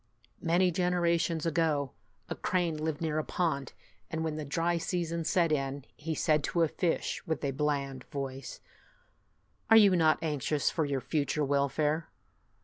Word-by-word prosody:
Many 180 +2 +3
generations 170 -2 +1
ago, 155 -4 +1 0.4
a - - -3
crane 175 -3 0
lived 155 0 -3
near 155 -2 0
a - - -1
pond, 150 -8 -1 0.4
and 160 0 -2
when 160 -1 -2
the 155 - -4
dry 165 +4 0
season 170 -1 -2
set 170 -1 +2
in, 135 -2 -1
he 160 +1 -4
said 155 -2 +2
to 170 - +1
a - - +3
fish, 170 +2 -1
with 160 -2 -2
a 140 - 0
bland 140 -2 -2
voice, 135 -1 -6 0.5
" - - -42
Are 225 - +8
you 200 -4 +7
not 160 -2 +4
anxious 150 -1 0
for 160 - 0
your 140 -2 -1
future 150 0 0
welfare? 145 +3 0
155 Hz, 160 wpm, -30 LUFS, 145-170 Hz, 0.5 s, Are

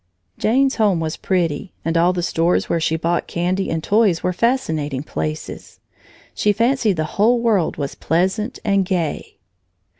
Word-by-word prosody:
Jane's 265 +4 +2
home 205 -6 +2
was 160 -1 -2
pretty 175 -1 -1
and 165 +1 -1
all 170 +2 +4
the 180 -1 -3
stores 170 0 +1
where 170 - 0
she 160 0 0
bought 170 +2 -1
candy 180 +3 -1
and 160 -1 -2
toys 205 -4 +2
were 180 - 0
fascinating 160 - -1
places. 75 - -6 0.5
She 210 - +1
fancied 230 0 +2
the 155 - -1
whole 215 +9 +2
world 215 -8 +1
was 140 -2 -3
pleasant 190 +8 -1
and 200 -2 +3
gay. 175 -4 -3
180 Hz, 155 wpm, -20 LUFS, 160-215 Hz, 0.5 s, all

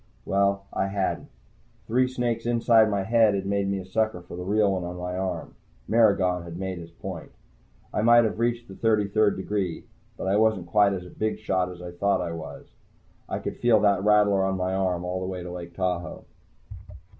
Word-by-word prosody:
Well, 100 0 +1
I 95 - 0
hadn't. 95 -1 -2 0.6
Three 125 +3 +2
snakes 120 -2 -2
inside 115 -2 +4
my 100 -2 0
head 110 0 +4
had 95 - -2
made 100 0 0
me 100 - 0
a 95 - -6
sucker 110 0 -1
for 90 - -10
the 90 - -6
real 100 +1 +2
one 95 -2 -2
on 90 0 -5
my 90 0 -4
arm. 90 -3 -3 0.3
Maragon 100 -6 +3
had 85 0 -8
made 95 -1 -4
his 85 0 -10
point. 85 0 -8 0.6
I - - 0
might 120 +1 +6
have 110 0 -2
reached 120 0 0
the 95 - -10
thirty 105 0 +1
third 105 +1 +2
degree, 95 -3 -2 0.3
but - - -5
I 95 +2 +2
wasn't 110 -5 +2
quite 100 +2 +3
as 90 -2 -5
big 110 +4 -2
a - - -14
shot 95 -3 -1
as 90 0 -10
I 90 - -6
thought 100 +3 +1
I 85 -2 -3
was. 80 -4 -8 0.6
I - - -2
could - - -5
feel 120 -3 +4
that 100 -2 +3
rattler 105 -2 +4
on 95 0 0
my 90 0 -1
arm 90 -2 -1
all 90 +1 -2
the 95 - -4
way 90 -1 -5
to 90 - -7
Lake 85 -1 -8
Tahoe. 90 -1 -3
95 Hz, 210 wpm, -26 LUFS, 90-110 Hz, 0.6 s, might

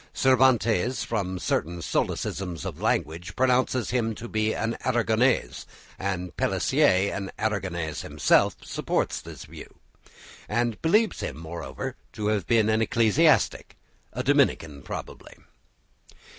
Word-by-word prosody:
Cervantes 125 -3 +3
from 95 -2 -2
certain 85 -1 -1
solecisms 85 +1 -2
of - - -6
language 85 +4 -1
pronounces 130 -2 +1
him 115 -3 0
to 120 - -8
be 110 -1 0
an 115 +1 -1
Aragonese, 115 - +1 0.3
and 90 -2 -3
Pellicer, 95 +2 +2
an 100 0 -4
Aragonese 90 -7 -2
himself, - - +2
supports - - -2
this - - -10
view - - -12 0.7
and 120 0 -1
believes 210 +7 +2
him, - - -4
moreover, 80 -4 -6 0.2
to 105 -2 -2
have 105 -2 -1
been 115 -2 +3
an 110 0 +2
ecclesiastic, 115 +4 +2 0.3
a - - -4
Dominican 75 -3 +1
probably. - - -8
110 Hz, 115 wpm, -26 LUFS, 90-120 Hz, 0.7 s, Cervantes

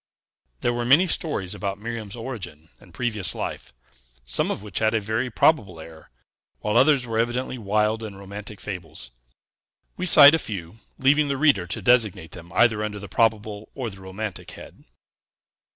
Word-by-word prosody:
There 120 - +1
were 120 0 -2
many 140 +10 +5
stories 150 - -1
about 100 -1 -4
Miriam's 110 -1 -6
origin 95 - -7
and 95 - -18
previous 105 -1 -1
life, - - -5 0.5
some - - -1
of - - -4
which 105 -3 -4
had 110 0 +2
a - - +3
very 110 +4 -2
probable 105 - +2
air, 80 0 -12 0.5
while 105 +1 -1
others 135 +1 +4
were 115 -1 -2
evidently 125 +2 -1
wild 105 +1 0
and 105 -3 -7
romantic 100 +1 -9
fables. 80 - -8 0.9
We 185 - -2
cite 145 -3 +9
a 160 - +3
few, 100 - -6 0.2
leaving 145 +3 +3
the 140 -1 -1
reader 135 - +3
to 95 - -5
designate 105 -10 +2
them 85 0 -12
either 115 -3 +4
under 105 -1 -4
the 100 0 -8
probable 110 -2 0
or 125 -5 -4
the 95 0 -13
romantic 95 +2 -6
head. - - -14
110 Hz, 170 wpm, -24 LUFS, 95-120 Hz, 0.9 s, cite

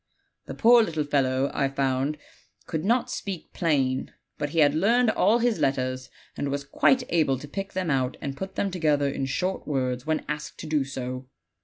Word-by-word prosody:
The - - -6
poor 240 +1 +6
little 160 -8 -1
fellow, 135 -2 +1
I 140 - +1
found, 135 +1 0 0.5
could 160 -1 -3
not 235 +5 +1
speak 195 -4 -5
plain; 135 -6 0 0.3
but 145 - -1
he 165 - -6
had 145 -2 +5
learned 225 +8 +3
all 220 +2 +3
his 235 -5 +1
letters, 130 -2 -1 0.3
and 145 - -2
was 140 0 -2
quite 255 - +3
able 155 -6 +2
to 145 - -9
pick 195 +6 -5
them 185 -4 -1
out 130 -1 0
and 140 -1 -4
put 190 +5 -6
them 200 - -1
together 150 -5 +1
in 135 -1 -2
short 185 +7 -2
words 130 -3 -1
when 155 -1 0
asked 150 0 -5
to - - -7
do 155 -2 +1
so. 130 -1 -5
145 Hz, 190 wpm, -26 LUFS, 135-185 Hz, 0.5 s, poor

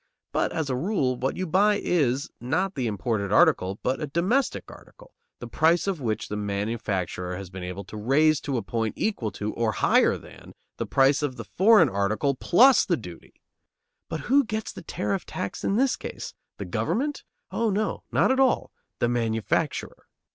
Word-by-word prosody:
But, - - 0
as 160 -3 -2
a - - 0
rule, 140 -4 0
what 130 +2 -2
you 185 - -2
buy 200 +5 +3
is, 140 -9 0
not 170 +10 -1
the 130 -4 -2
imported 105 -2 -2
article, 95 -2 +3
but 130 +1 -1
a 150 - -2
domestic 185 - 0
article, - - -16 0.2
the - - -8
price 165 +2 +2
of 190 -6 -2
which 110 -4 -2
the 105 - -4
manufacturer 100 -3 -3
has 95 -2 -8
been 95 -1 -7
able 90 +2 -5
to 110 - -10
raise 145 +7 +3
to 135 -3 -2
a 115 - -2
point 115 -2 -2
equal 200 - -1
to, 105 +1 -4
or 115 -2 0
higher - - +3
than, - - -14 0.2
the - - -3
price 135 +2 +3
of 145 -4 -2
the - - -7
foreign 200 -3 +5
article 110 +6 0
plus 245 - +5
the 175 - 0
duty. 90 -8 -11 0.7
But 160 - -4
who 275 - +3
gets 220 -2 -4
the - - -9
tariff 195 -2 -3
tax 100 - -5
in 195 - +1
this 260 +3 +2
case? - - -7 0.2
The - - -5
government? 290 +4 -2 0.3
Oh, 230 -1 0
no; 210 +1 -1
not - - +3
at 265 - +1
all. 265 -2 +2 0.3
The 120 - +1
manufacturer. 115 -2 -1
135 Hz, 185 wpm, -25 LUFS, -, 0.7 s, foreign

